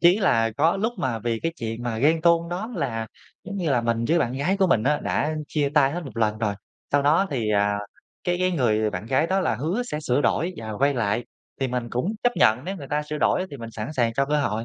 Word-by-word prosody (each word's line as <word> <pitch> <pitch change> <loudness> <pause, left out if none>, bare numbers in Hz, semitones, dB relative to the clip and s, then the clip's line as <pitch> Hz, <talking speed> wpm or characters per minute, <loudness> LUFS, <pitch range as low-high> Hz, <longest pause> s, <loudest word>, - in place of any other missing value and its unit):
chí 175 +4 +6
là 115 - +3
có 165 +5 +3
lúc 225 +4 0
mà 120 -4 -1
vì 115 0 -2
cái 165 - -1
chuyện 115 +1 -4
mà 115 -2 -2
ghen 160 +5 +3
tuông 170 0 +3
đó, 190 +7 -4
là 115 -7 -2 0.4
giống 200 +1 -6
như 170 -6 -1
là 125 -3 +3
mình 115 0 0
với 170 +1 +4
bạn 125 -5 0
gái 145 +9 0
của 195 - +3
mình 115 -11 +3
á, 150 +4 +1
đã 155 +1 0
chia 145 -2 0
tay 140 -2 +4
hết 175 -1 -4
một 135 - -10
lần 110 -1 +1
rồi, 105 -2 0 0.4
sau 145 0 +4
đó 160 +7 +4
thì, 115 -6 -1
à, 100 0 +2 0.5
cái 175 0 +1
cái 185 0 +2
người 110 -7 +2
bạn 95 +3 -5
gái 135 +5 +2
đó 190 +2 +1
là 185 - +1
hứa 165 - -1
sẽ 150 -11 -4
sửa 135 -2 +1
đổi 170 +6 +1
và 110 -1 -6
quay 140 +6 +2
lại, 115 -1 0 0.4
thì 135 - +1
mình 120 -2 -3
cũng 170 - -1
chấp 245 0 +3
nhận 110 +5 +4
nếu 195 +2 -4
người 140 -5 -9
ta 150 +1 0
sửa 150 0 -5
đổi 185 - +2
á 190 - -2
thì 140 - -7
mình 115 -2 -8
sẵn 110 +6 -5
sàng 120 -6 +1
cho 140 +2 +1
cơ 150 0 +1
hội. 115 -3 -1
140 Hz, 270 wpm, -24 LUFS, 115-170 Hz, 0.5 s, chí